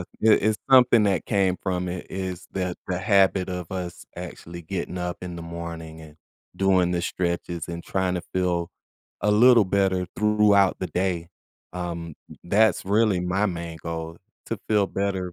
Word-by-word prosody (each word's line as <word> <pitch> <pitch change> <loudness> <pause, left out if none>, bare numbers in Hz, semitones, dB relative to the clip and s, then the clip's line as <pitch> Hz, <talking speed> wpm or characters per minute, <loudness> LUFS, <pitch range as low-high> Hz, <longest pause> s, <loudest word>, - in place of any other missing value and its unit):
i - - -5 0.2
it's 110 -1 +4
something 125 -3 +7
that 100 -5 +1
came 95 -4 +2
from 90 -1 -1
it 90 +1 -5
is 95 -1 -5
that 90 -2 -3
the 90 - -1
habit 95 -1 +3
of 90 -2 -5
us 90 -2 -6
actually 85 -1 -8
getting 90 +1 -4
up 90 -1 -3
in 90 -1 -6
the 85 - -7
morning 85 -1 -7
and 80 -1 -13 0.4
doing 95 -2 +3
the 85 -1 -1
stretches 85 -1 -3
and 85 0 -6
trying 95 -1 -1
to 90 - -3
feel 90 -2 0 0.5
a 105 - +2
little 115 +1 +6
better 95 -1 +1
throughout 105 -2 +4
the 95 - -2
day, 90 -2 -2 0.5
um, 85 -2 -5 0.3
that's 100 +2 +3
really 105 -2 +3
my 90 +3 0
main 85 -3 -5
goal, 80 0 -5 0.3
to 115 - -3
feel 105 -2 +3
better. 95 -2 -2
90 Hz, 165 wpm, -25 LUFS, 85-100 Hz, 0.5 s, something